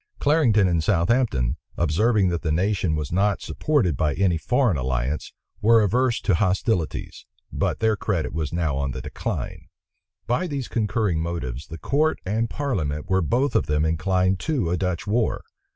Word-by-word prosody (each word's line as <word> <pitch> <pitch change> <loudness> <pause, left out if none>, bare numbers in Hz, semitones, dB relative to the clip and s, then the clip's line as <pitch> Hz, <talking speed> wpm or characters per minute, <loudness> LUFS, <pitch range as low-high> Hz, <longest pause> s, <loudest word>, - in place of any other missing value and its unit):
Clarendon 125 - +3
and 85 -3 +1
Southampton, 90 - +1 0.2
observing 95 +5 +2
that 85 -1 -2
the 80 - -1
nation 90 0 +1
was 75 -2 -3
not 100 +3 +1
supported 130 - 0
by 75 +1 0
any 95 -3 +2
foreign 120 - +1
alliance, 65 +2 -2 0.3
were 115 +1 +5
averse 120 +4 +1
to 100 - +1
hostilities; 95 -1 -1 0.3
but - - -1
their 110 -1 +3
credit 90 -8 -2
was 80 -2 -2
now 80 -4 -1
on 70 -2 -2
the 65 - -5
decline. - - -5 0.6
By 125 - 0
these 140 -5 -4
concurring 105 -6 0
motives, 80 -6 -4
the 80 - -8
court 150 - +1
and 110 +4 0
parliament 80 - -2
were 95 0 +3
both 125 - 0
of - - +2
them 75 +1 +1
inclined 95 +3 +1
to 130 - -1
a - - +2
Dutch 90 -2 -2
war. 110 +2 0
95 Hz, 165 wpm, -24 LUFS, 80-115 Hz, 0.6 s, were